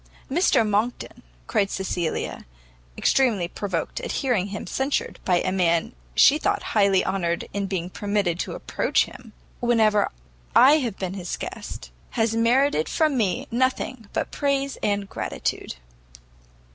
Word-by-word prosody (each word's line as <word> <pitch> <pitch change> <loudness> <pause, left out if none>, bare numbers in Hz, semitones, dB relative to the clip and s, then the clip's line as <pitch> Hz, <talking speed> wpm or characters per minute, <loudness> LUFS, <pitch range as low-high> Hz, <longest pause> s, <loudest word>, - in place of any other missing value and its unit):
"Mr 285 - +3
Monckton," 210 +4 -1 0.2
cried 195 - +1
Cecilia, 180 - -3 0.5
extremely 225 -10 +2
provoked 180 -3 -3
at - - -4
hearing 240 -8 0
him 205 +1 -6
censured 270 +2 -2
by 180 -1 +3
a 185 - -1
man 180 +3 +1 0.2
she 295 +3 +6
thought - - 0
highly 200 -3 +4
honoured 170 -3 -1
in 200 0 -1
being 185 -3 -2
permitted 200 -2 -1
to - - -3
approach - - +1
him, 230 -3 -13 0.3
"whenever 220 -4 +3 0.5
I 280 +5 +8
have 235 -8 -3
been 185 -1 -3
his 180 -3 -4
guest, - - -7 0.3
has 225 0 +2
merited 235 - +3
from 310 -3 +2
me 200 -8 0
nothing 255 -2 -1
but - - -2
praise 275 -1 0
and 200 -1 0
gratitude." - - -3
205 Hz, 135 wpm, -24 LUFS, 185-250 Hz, 0.5 s, I